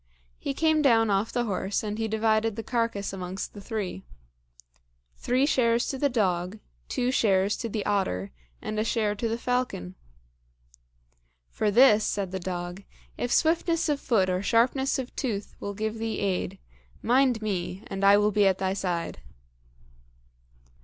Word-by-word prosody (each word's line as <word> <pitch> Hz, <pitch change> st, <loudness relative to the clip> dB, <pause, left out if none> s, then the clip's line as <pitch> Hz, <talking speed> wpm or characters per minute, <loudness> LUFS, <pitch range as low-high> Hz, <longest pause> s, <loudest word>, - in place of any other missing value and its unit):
He 275 Hz, -, -3 dB
came 315 Hz, 0 st, +3 dB
down 225 Hz, -6 st, +4 dB
off 200 Hz, +3 st, +1 dB
the 245 Hz, -, 0 dB
horse 200 Hz, -2 st, -2 dB
and 210 Hz, 0 st, -4 dB
he 225 Hz, -, 0 dB
divided 220 Hz, 0 st, +1 dB
the 225 Hz, -, -5 dB
carcass 230 Hz, -4 st, -1 dB
amongst 185 Hz, 0 st, -5 dB
the 205 Hz, -, -9 dB
three. 195 Hz, -, -4 dB, 1.1 s
Three 255 Hz, +3 st, +1 dB
shares 235 Hz, -5 st, +2 dB
to 270 Hz, -, -3 dB
the 285 Hz, -, +2 dB
dog, 185 Hz, -4 st, 0 dB, 0.3 s
two 250 Hz, 0 st, 0 dB
shares 200 Hz, -5 st, +2 dB
to 230 Hz, -, -4 dB
the 215 Hz, -1 st, -3 dB
otter, 100 Hz, -, -1 dB, 0.3 s
and 215 Hz, -, -3 dB
a -, -, +2 dB
share 220 Hz, -2 st, 0 dB
to 225 Hz, +2 st, -2 dB
the 225 Hz, -, -1 dB
falcon. 245 Hz, -, -2 dB, 1.6 s
"For 215 Hz, -, 0 dB
this," 220 Hz, -1 st, +6 dB
said 200 Hz, -3 st, -2 dB
the 190 Hz, -, -3 dB
dog, 175 Hz, +1 st, -5 dB, 0.3 s
"if 245 Hz, -, -3 dB
swiftness 330 Hz, 0 st, +2 dB
of 290 Hz, -1 st, +1 dB
foot 210 Hz, -9 st, +2 dB
or 185 Hz, 0 st, 0 dB
sharpness 245 Hz, +6 st, +2 dB
of 260 Hz, -2 st, -6 dB
tooth 210 Hz, -6 st, -3 dB
will 200 Hz, 0 st, -5 dB
give 220 Hz, +2 st, -3 dB
thee 225 Hz, 0 st, -2 dB
aid, 195 Hz, -2 st, -1 dB, 0.5 s
mind 250 Hz, 0 st, +3 dB
me, 190 Hz, -2 st, -3 dB
and 195 Hz, 0 st, -5 dB
I 200 Hz, +1 st, +7 dB
will 210 Hz, +1 st, +3 dB
be 205 Hz, -1 st, +4 dB
at 190 Hz, -1 st, +2 dB
thy 190 Hz, 0 st, -1 dB
side." 180 Hz, -4 st, -3 dB
215 Hz, 160 wpm, -27 LUFS, 195-240 Hz, 1.6 s, I